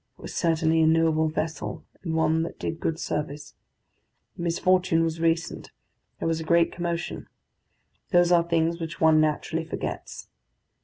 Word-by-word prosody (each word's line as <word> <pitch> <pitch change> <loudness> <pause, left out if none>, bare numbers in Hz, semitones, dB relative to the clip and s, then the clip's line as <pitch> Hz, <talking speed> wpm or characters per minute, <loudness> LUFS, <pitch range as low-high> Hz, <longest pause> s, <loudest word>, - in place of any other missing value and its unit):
It - - -18
was - - -7
certainly 160 -1 +2
a 160 - +4
noble 160 -1 +3
vessel, 155 0 -4 0.2
and 165 -3 -3
one 160 0 +2
that 165 - -5
did 165 - -4
good 165 0 -2
service. 150 0 -4 0.8
The - - -8
misfortune 175 0 +2
was 165 0 -2
recent; 165 0 -1 0.5
there - - -3
was 165 -1 0
a - - -4
great 170 +1 +3
commotion. 170 0 -4 0.8
Those 175 -1 +4
are 175 -1 +6
things 170 0 0
which 165 0 -5
one 160 -1 +5
naturally 155 +1 0
forgets. 165 - -6
165 Hz, 155 wpm, -26 LUFS, 160-170 Hz, 0.8 s, are